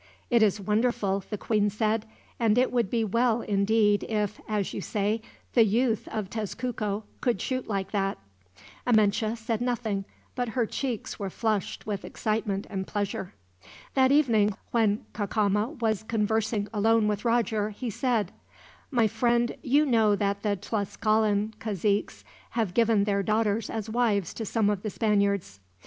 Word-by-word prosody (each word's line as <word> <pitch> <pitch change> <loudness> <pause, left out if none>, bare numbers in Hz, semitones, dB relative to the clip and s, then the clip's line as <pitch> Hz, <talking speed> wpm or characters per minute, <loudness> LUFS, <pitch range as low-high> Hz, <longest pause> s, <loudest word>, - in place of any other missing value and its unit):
"It 235 -1 +5
is 210 -1 +3
wonderful," 205 -1 0
the 210 - -3
queen 210 0 +1
said; 215 +1 0 0.3
"and 225 -1 +3
it 255 +1 +3
would 240 -6 +1
be 230 +1 +1
well 230 +2 +2
indeed 205 +1 +2
if, 210 -2 -1
as 210 -3 -1
you - - -4
say, 210 +2 -1 0.3
the 235 - +6
youth 225 +1 +1
of 215 -3 -3
Tezcuco 215 0 -3 0.2
could 240 -7 +1
shoot 255 -1 -2
like 195 -2 -2
that." 195 -2 0 0.7
Amenche 220 0 +3
said 225 0 -2
nothing, 225 -5 -1 0.3
but 245 -2 -2
her 240 - +3
cheeks 245 0 -4
were 200 -2 -3
flushed 215 -1 -2
with 205 -3 -3
excitement 215 -2 -2
and 190 -1 -4
pleasure. 200 - -3 0.6
That 265 -1 +4
evening, 225 -8 +3 0.2
when 220 -3 +2
Cacama 210 +5 0
was 220 -3 +1
conversing 220 -1 0
alone 220 +1 +3
with 210 -1 -1
Roger, 225 -3 +1
he 230 +3 -5
said: 235 -1 0 0.6
"My 240 -5 +3
friend, 235 +2 +1
you 285 +4 +3
know 225 -6 +4
that 200 0 -1
the 205 -1 +1
Tlascalan 215 +1 0
caziques 205 -1 -1 0.3
have 215 -6 0
given 225 -2 +3
their 200 -1 +1
daughters 215 +1 0
as 220 -1 -4
wives 220 -6 +1
to 225 - -5
some 220 -1 +1
of 200 -2 -2
the 215 - -3
Spaniards. 200 - 0
215 Hz, 155 wpm, -27 LUFS, 205-230 Hz, 0.7 s, the